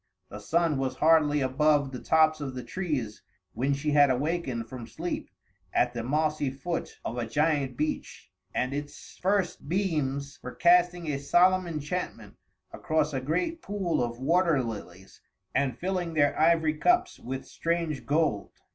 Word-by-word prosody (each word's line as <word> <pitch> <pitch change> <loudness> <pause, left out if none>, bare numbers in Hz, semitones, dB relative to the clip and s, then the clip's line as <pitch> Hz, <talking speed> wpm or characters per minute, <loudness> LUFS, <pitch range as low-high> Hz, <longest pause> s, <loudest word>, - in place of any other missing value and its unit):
The 105 - -8
sun 160 +6 +1
was 135 -1 -1
hardly 150 -2 +4
above 140 +1 +2
the 125 - -6
tops 155 -1 +3
of 135 -3 -4
the 125 - -5
trees 145 - -3 0.3
when 140 +3 0
she 150 +2 -2
had 145 -1 +6
awakened 130 -3 -1
from 120 -1 -8
sleep 165 +10 -4 0.4
at 120 0 +2
the 120 - -3
mossy 150 +2 0
foot 165 +6 -5
of 120 - -3
a 115 - -2
giant 145 -1 0
beech, 155 - -4 0.2
and 130 +2 -1
its 145 0 -7
first 190 -6 0
beams 150 -7 -1
were 125 - -8
casting 175 -1 +3
a 140 - -2
solemn 180 +6 +3
enchantment 150 - -4 0.4
across 155 -1 0
a 135 - -1
great 325 - -1
pool 185 -9 -1
of 120 0 -4
water 165 +1 +2
lilies 95 -5 -8 0.3
and 130 -4 0
filling 180 -2 -2
their 145 -2 +3
ivory 160 -1 +4
cups 360 - +2
with 130 +2 -5
strange 165 -4 -2
gold. 145 -9 0
150 Hz, 155 wpm, -28 LUFS, 130-170 Hz, 0.4 s, had